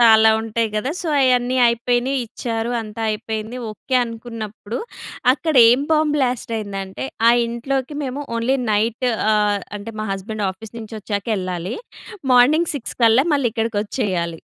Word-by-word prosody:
చాలా 220 -1 +7
ఉంటాయి 225 0 -1
గదా 215 +6 -1
సో 340 - -3
అయన్నీ 255 -1 +3
అయిపోయినియి, 245 +3 +1
ఇచ్చారు. 230 0 -3
అంతా 215 0 -8
అయిపోయింది 220 +2 -4
ఓకే 260 +5 -5
అనుకున్నప్పుడు, 225 -1 -6 0.5
అక్కడేం 255 -4 +5
బాంబ్ 305 -1 +3
బ్లాస్ట్ 250 -3 -1
అయిందంటే 195 -1 -5 0.2
ఆ - - +8 0.2
ఇంట్లోకి 260 +4 -3
మేము 270 +2 -4
ఓన్లీ 245 +4 +1 0.2
నైట్ 225 +4 +1 0.3
ఆహ్, 210 -1 +2 0.2
అంటే 225 +3 -8
మా 215 - -3
హస్బెండ్ 205 +2 -3
ఆఫీస్ 205 +4 -12
నుంచొచ్చాకెళ్ళాలి. 205 -3 -3 0.6
మార్నింగ్ 295 +7 +5
6 270 -5 -5
కల్లా 230 +4 +6
మళ్ళీ 275 -4 +2
ఇక్కడికొచ్చేయాలి. 205 -6 -2
230 Hz, 130 wpm, -21 LUFS, 215-250 Hz, 0.6 s, ఆ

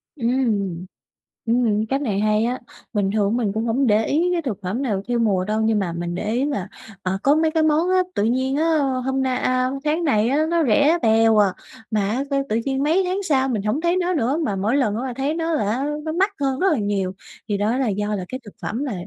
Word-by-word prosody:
Ứm, 240 -6 -2 0.2
ừm. 195 -6 -2 0.6
Ừm, 225 -3 +2
cách 270 +1 0
này 210 -8 -1
hay 215 +1 +2
á. 250 +2 -2 0.3
Bình 205 -3 +1
thường 215 +2 +1
mình 210 -5 -1
cũng 220 +2 -2
hổng 250 +3 +1
để 215 +1 +3
ý 335 +5 +1
cái 345 - 0
thực 250 - -3
phẩm 195 +8 -3
nào 210 -8 -1
theo 240 -1 0
mùa 200 -5 +2
đâu. 215 +2 -1
Nhưng 220 -1 +2
mà 180 -4 -2
mình 175 0 -4
để 210 +4 -3
ý 255 +4 +1
là, 270 -11 -2 0.4
à, 185 +1 -1
có 285 +2 +4
mấy 315 0 +2
cái 320 0 +2
món 315 +3 +2
á, 370 - +3 0.2
tự 205 - +1
nhiên 260 +4 +1
á 305 - +1 0.4
hôm 265 0 0
nay 255 -1 0
a, 255 0 +1
tháng 310 +3 0
này 230 -7 +2
á 295 +4 +2
nó 340 -1 +2
rẻ 285 +8 +4
bèo 225 0 +4
à, 200 -3 +4 0.4
mà 210 -2 +1
á 250 +6 -1
sao 275 -1 +1
tự 220 - +1
nhiên 270 0 0
mấy 330 +6 +2
tháng 375 +2 -2
sau 270 -6 +1
mình 220 -5 -1
hổng 215 +9 -1
thấy 345 +2 +1
nó 360 0 0
nữa, 275 -1 0
mà 205 - -1
mỗi 205 +6 0
lần 220 -7 +1
á 235 - -3
là 250 - -4
thấy 275 +4 -1
nó 330 0 -1
là 210 -9 0
á 260 +5 -1 0.2
nó 315 - -3
mắc 380 +4 +2
hơn 270 -1 0
rất 385 0 +3
là 270 - 0
nhiều, 200 -3 -1 0.4
thì 205 - 0
đó 215 +5 0
là 265 -3 0
do 210 +1 -1
là 185 -3 -4
cái 255 - -5
thực 205 - -11
phẩm 235 +6 -3
là 270 -6 -3
245 Hz, 260 wpm, -22 LUFS, 210-285 Hz, 0.6 s, có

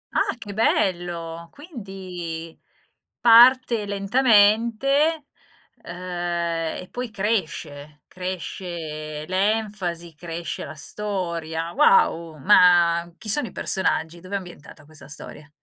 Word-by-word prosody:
Ah, - - +1
che 205 -4 -8
bello! 170 -5 -1
Quindi 185 - -8 0.6
parte 240 -2 +6
lentamente, 235 +8 +3 0.6
ehm, 175 -2 -3
e 180 - -14
poi 245 -1 -5
cresce, 155 -8 -3
cresce 170 -4 -6
l'enfasi, 190 -4 -1
cresce 170 +1 -6
la - - -9
storia. 170 -3 -4
Wow, 165 -4 +3
ma 170 0 +4
chi 215 - -12
sono 240 +4 +2
i - - -11
personaggi? 175 -3 0
Dov'è 185 +3 -6
ambientata 170 -5 -9
questa 155 0 -12
storia? 145 0 -9
180 Hz, 95 wpm, -23 LUFS, 165-210 Hz, 0.6 s, parte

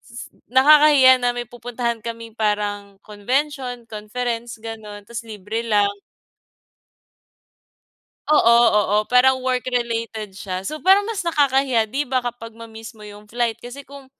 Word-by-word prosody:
s 240 0 -11 0.2
nakakahiya 265 -1 +6
na 245 0 0
may 240 - -3
pupuntahan 240 0 -4
kaming 230 0 -7
parang 205 -2 -2
convention, 250 +3 -3
conference 230 +2 -5
ganon 215 -2 -9
tapos 235 +2 -7
libre 210 +1 -5
lang. 205 -3 +1 2.4
Oo, 235 -6 +5 0.2
oo 205 0 +1
parang 260 +1 +4
work 255 -1 -1
related 230 -4 -3
siya. 190 -1 -6
So 305 +9 -5
parang 385 +7 +4
mas 390 -6 -4
nakakahiya 270 -7 +1
'di 280 +2 -2
ba, 255 0 -1
kapag 230 -2 -7
ma-miss 225 0 -11
mo 215 - -16
yung 210 0 -12
flight 235 0 -2
kasi 245 +4 -10
kung 280 -1 -14
235 Hz, 135 wpm, -21 LUFS, 215-260 Hz, 2.4 s, nakakahiya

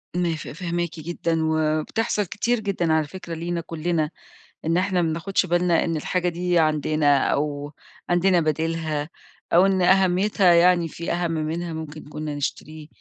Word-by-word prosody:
ما 175 -2 0
ف 155 - -8
فاهماكِ 170 0 -3
جدًا 165 0 -2
وبتحصل 160 +8 0
كتير 235 +6 -1
جدًا 185 -6 0
على 155 -2 +1
فكرة 170 +1 -8
لينا 170 +1 -3
كُلّنا 165 -1 -2 0.5
إن 165 +2 +1
إحنا 185 -1 +1
ما 165 - +1
بناخُدش 185 +4 0
بالنا 175 0 +2
إن 165 -2 -1
الحاجة 180 +3 -1
دي 175 0 0
عندنا 155 -2 +2
أو 145 0 -2 0.4
عندنا 175 0 +3
بديلها، 155 -1 -1 0.4
أو 180 +3 +6
إن 190 -1 +2
أهمّيتها 190 0 +4
يعني 175 0 +4
في 170 +2 -4
أهَم 175 -1 -1
منها 165 +2 -2
ممكن 160 -1 -7
كُنّا 150 0 -5
نشتريه، 150 +2 -5
170 Hz, 150 wpm, -23 LUFS, 155-180 Hz, 0.5 s, أو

